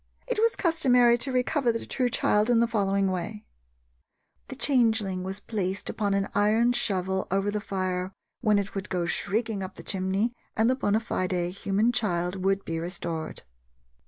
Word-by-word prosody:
It - - -1
was 455 +1 +3
customary 250 - +4
to 265 - -1
recover 255 0 +1
the 230 - -4
true 250 -2 0
child 210 -1 +2
in 240 -2 +4
the 235 - +4
following 200 -4 +1
way: 195 +4 -4 1.0
The 265 - -7
changeling 225 -9 +2
was 190 +2 -4
placed 195 -2 -3
upon 205 -2 0
an 195 0 0
iron 220 +4 +3
shovel 190 -4 -1
over 195 +2 +1
the 210 0 -2
fire, 185 -2 -2 0.3
when 215 -3 +3
it 200 0 -2
would 195 0 -5
go 180 -2 -1
shrieking 210 +4 -1
up 185 - -6
the - - -10
chimney, 195 +5 -1 0.2
and 220 +1 +4
the - - +1
bona 215 -4 +1
fide 185 -5 -2 0.2
human 200 +4 +1
child 185 -5 -1
would 195 0 +1
be 165 0 -3
restored. 170 -2 -5
205 Hz, 170 wpm, -27 LUFS, 190-235 Hz, 1.0 s, customary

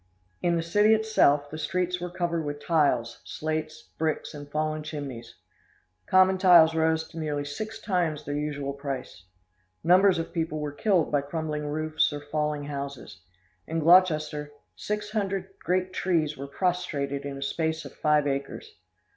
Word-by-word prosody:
In 175 -1 +2
the 165 - 0
city 210 +6 +4
itself, 150 -10 +2
the 155 - -6
streets 180 +3 -1
were 180 - -3
covered 170 -2 -2
with 145 -1 -4
tiles, 140 -8 +1
slates, 155 0 -4
bricks, 155 -1 -1
and 145 -1 -9
fallen 155 +1 -1
chimneys. 140 -6 -7 0.7
Common 185 0 +5
tiles 170 -4 +7
rose 160 0 +1
to 165 - -8
nearly 145 -2 -2
six 215 +10 -5
times 170 -8 -1
their 145 - -3
usual 145 -2 -3
price. 135 -9 -6 0.6
Numbers 185 +2 +5
of 165 0 -4
people 160 -2 -2
were 150 -1 -3
killed 180 +2 +1
by 145 -1 +2
crumbling 150 0 -3
roofs 155 +1 +1
or 145 - -4
falling 150 0 -2
houses. 140 -6 -6 0.5
In 165 - -3
Gloucester, 155 -3 +4 0.2
six 210 0 -4
hundred 195 -3 -2
great 185 +1 -1
trees 160 -6 0
were 140 0 -7
prostrated 140 -4 -1
in 140 -1 -5
a 135 - -4
space 160 +3 -2
of - - -9
five 150 -1 +2
acres. 140 - -4
155 Hz, 155 wpm, -27 LUFS, 145-175 Hz, 0.7 s, tiles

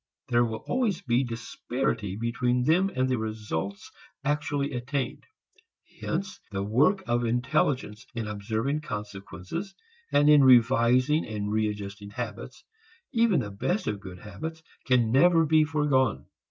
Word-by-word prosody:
There 120 -1 +4
will 110 -2 -3
always 230 -9 0
be 120 +1 +2
disparity 115 -3 -3
between 125 +2 0
them 175 +8 +3
and 130 0 +1
the 130 -2 0
results 105 -3 -4 0.3
actually 145 -1 -1
attained. 130 +2 -3 0.7
Hence 190 +3 -3
the 100 -2 -3
work 145 - +2
of 120 0 0
intelligence 125 -2 0
in 115 -2 -3
observing 110 +8 -2
consequences 105 - -6 0.4
and 145 - +4
in 150 -2 +7
revising 125 +3 +5
and 105 -1 -3
readjusting 105 -1 -3
habits, 115 +2 -7 0.5
even 230 - +3
the 105 -3 -5
best 175 - -1
of 105 -1 -2
good 95 -2 -9
habits, 160 - -7 0.2
can 120 -4 +3
never 165 +5 +5
be 155 0 +4
foregone. 145 -6 +1
125 Hz, 130 wpm, -27 LUFS, 105-150 Hz, 0.7 s, in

